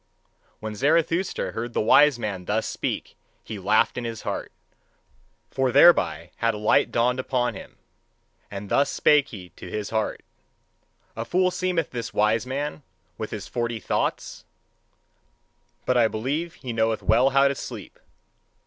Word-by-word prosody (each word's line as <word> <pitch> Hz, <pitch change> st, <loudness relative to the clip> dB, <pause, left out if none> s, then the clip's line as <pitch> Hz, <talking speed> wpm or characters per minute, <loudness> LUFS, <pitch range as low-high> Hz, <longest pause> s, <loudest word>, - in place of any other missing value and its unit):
When 110 Hz, 0 st, -5 dB
Zarathustra 165 Hz, -, +1 dB
heard 115 Hz, +1 st, -5 dB
the -, -, 0 dB
wise 145 Hz, +5 st, +5 dB
man 100 Hz, -6 st, -4 dB
thus 110 Hz, +4 st, 0 dB
speak, -, -, -4 dB, 0.3 s
he 110 Hz, -3 st, -7 dB
laughed 105 Hz, +5 st, +2 dB
in -, -, -6 dB
his 115 Hz, -2 st, -5 dB
heart: -, -, -4 dB, 1.0 s
for 135 Hz, -1 st, 0 dB
thereby 90 Hz, -, +5 dB
had 115 Hz, -1 st, +1 dB
a -, -, -5 dB
light 105 Hz, 0 st, +2 dB
dawned 125 Hz, +2 st, +1 dB
upon 125 Hz, -2 st, 0 dB
him. 95 Hz, -, -11 dB, 0.7 s
And 100 Hz, 0 st, -7 dB
thus 140 Hz, 0 st, +3 dB
spake 150 Hz, -2 st, +3 dB
he 95 Hz, -7 st, -10 dB
to 90 Hz, -, -11 dB
his 105 Hz, +2 st, -4 dB
heart: 110 Hz, -1 st, -2 dB, 0.9 s
A 115 Hz, -, -3 dB
fool 185 Hz, +8 st, +1 dB
seemeth 180 Hz, -2 st, -1 dB
this 120 Hz, -2 st, -5 dB
wise 110 Hz, +3 st, +2 dB
man 145 Hz, +3 st, -3 dB, 0.4 s
with 110 Hz, -, -4 dB
his 105 Hz, -4 st, -6 dB
forty 120 Hz, -1 st, -2 dB
thoughts: -, -, -2 dB, 1.4 s
but 125 Hz, -, +2 dB
I 115 Hz, -2 st, +5 dB
believe 140 Hz, +11 st, -3 dB
he 125 Hz, -8 st, -6 dB
knoweth 110 Hz, -1 st, 0 dB
well 125 Hz, +4 st, +4 dB
how 135 Hz, +1 st, +4 dB
to 140 Hz, -, +1 dB
sleep. -, -, -9 dB
120 Hz, 150 wpm, -24 LUFS, 110-140 Hz, 1.4 s, wise